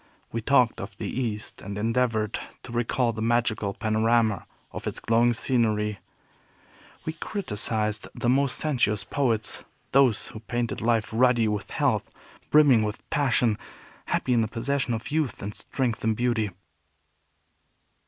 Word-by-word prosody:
We 115 Hz, -, -2 dB
talked 125 Hz, -1 st, +3 dB
of -, -, -8 dB
the -, -, -5 dB
East, 110 Hz, -5 st, -3 dB
and 100 Hz, +1 st, -6 dB
endeavored 115 Hz, -1 st, 0 dB, 0.2 s
to -, -, -10 dB
recall 120 Hz, 0 st, 0 dB
the 110 Hz, -, -5 dB
magical 110 Hz, -3 st, +1 dB
panorama 110 Hz, -1 st, +1 dB, 0.2 s
of -, -, -6 dB
its -, -, -3 dB
glowing 115 Hz, +2 st, +3 dB
scenery. 110 Hz, -4 st, 0 dB, 1.1 s
We 160 Hz, -, -2 dB
criticized 110 Hz, -, 0 dB
the -, -, -2 dB
most 135 Hz, +1 st, +3 dB
sensuous 120 Hz, -9 st, +1 dB
poets, 115 Hz, -1 st, 0 dB, 0.3 s
those 130 Hz, -6 st, +4 dB
who 110 Hz, -, -9 dB
painted 120 Hz, +1 st, -3 dB
life 115 Hz, -2 st, +1 dB
ruddy 120 Hz, -1 st, +4 dB
with 105 Hz, -1 st, -2 dB
health, -, -, 0 dB, 0.4 s
brimming 145 Hz, -6 st, +6 dB
with 105 Hz, 0 st, -4 dB
passion, 125 Hz, -6 st, +2 dB, 0.5 s
happy 125 Hz, -, 0 dB
in 120 Hz, -, +4 dB
the 110 Hz, -, 0 dB
possession 125 Hz, +2 st, -1 dB
of 115 Hz, +6 st, -6 dB
youth 155 Hz, -4 st, 0 dB
and 105 Hz, +1 st, -4 dB
strength 125 Hz, -1 st, -2 dB
and 110 Hz, 0 st, +2 dB
beauty. 120 Hz, -3 st, +1 dB
115 Hz, 140 wpm, -26 LUFS, 110-125 Hz, 1.1 s, brimming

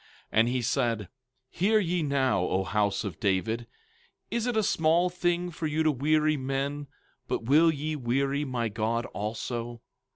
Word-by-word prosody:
17:13 -, -, +4 dB
And 115 Hz, -, +5 dB
he 125 Hz, 0 st, 0 dB
said: 115 Hz, -4 st, 0 dB, 0.4 s
Hear 215 Hz, +5 st, +3 dB
ye 180 Hz, -3 st, 0 dB
now, 140 Hz, -6 st, +1 dB
O 95 Hz, +1 st, 0 dB
house 100 Hz, +3 st, 0 dB
of 100 Hz, -7 st, -6 dB
David; 110 Hz, +4 st, 0 dB, 0.6 s
is 235 Hz, +1 st, -1 dB
it 240 Hz, -2 st, 0 dB
a 220 Hz, -, +3 dB
small 170 Hz, 0 st, +2 dB
thing 175 Hz, 0 st, 0 dB
for 160 Hz, -1 st, -3 dB
you 155 Hz, +1 st, 0 dB
to 155 Hz, -, +4 dB
weary 155 Hz, +2 st, +2 dB
men, 135 Hz, +2 st, -2 dB, 0.4 s
but -, -, -2 dB
will 155 Hz, +7 st, +5 dB
ye 155 Hz, +1 st, -3 dB
weary 135 Hz, +2 st, 0 dB
my 125 Hz, -4 st, -1 dB
God 115 Hz, +2 st, -1 dB
also? 115 Hz, +2 st, -4 dB
135 Hz, 165 wpm, -28 LUFS, 115-160 Hz, 0.6 s, And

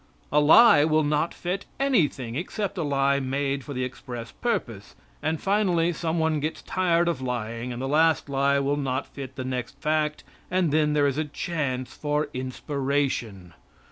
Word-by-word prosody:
A 150 Hz, -, +4 dB
lie 150 Hz, +3 st, +7 dB
will 155 Hz, 0 st, +3 dB
not 150 Hz, +3 st, +1 dB
fit 180 Hz, +3 st, -4 dB
anything 160 Hz, -, +1 dB
except 190 Hz, -, -3 dB
a 180 Hz, -, -2 dB
lie 140 Hz, -2 st, +2 dB
made 135 Hz, +1 st, -1 dB
for 145 Hz, -, -7 dB
the 130 Hz, -, -1 dB
express 120 Hz, -2 st, -6 dB
purpose; 115 Hz, -, -3 dB, 0.3 s
and, 155 Hz, +1 st, -1 dB
finally, 180 Hz, -4 st, +2 dB
some 165 Hz, 0 st, -2 dB
one 160 Hz, -1 st, +1 dB
gets 155 Hz, +2 st, -4 dB
tired 175 Hz, -2 st, +1 dB
of 165 Hz, -6 st, -1 dB
lying, 120 Hz, -1 st, -3 dB
and 120 Hz, -, -5 dB
the 135 Hz, -, -2 dB
last 155 Hz, +1 st, +3 dB
lie 140 Hz, 0 st, +2 dB
will 140 Hz, +1 st, 0 dB
not 130 Hz, -2 st, -1 dB
fit 135 Hz, -2 st, -9 dB
the 130 Hz, -, -5 dB
next 130 Hz, +1 st, -4 dB
fact, 150 Hz, 0 st, 0 dB, 0.3 s
and 180 Hz, -4 st, +1 dB
then 150 Hz, 0 st, +2 dB
there 145 Hz, -1 st, +3 dB
is 140 Hz, +1 st, 0 dB
a 155 Hz, -, 0 dB
chance 140 Hz, -4 st, -3 dB
for 150 Hz, 0 st, -1 dB
inspiration. 130 Hz, -, -2 dB
145 Hz, 175 wpm, -26 LUFS, 130-160 Hz, 0.3 s, lie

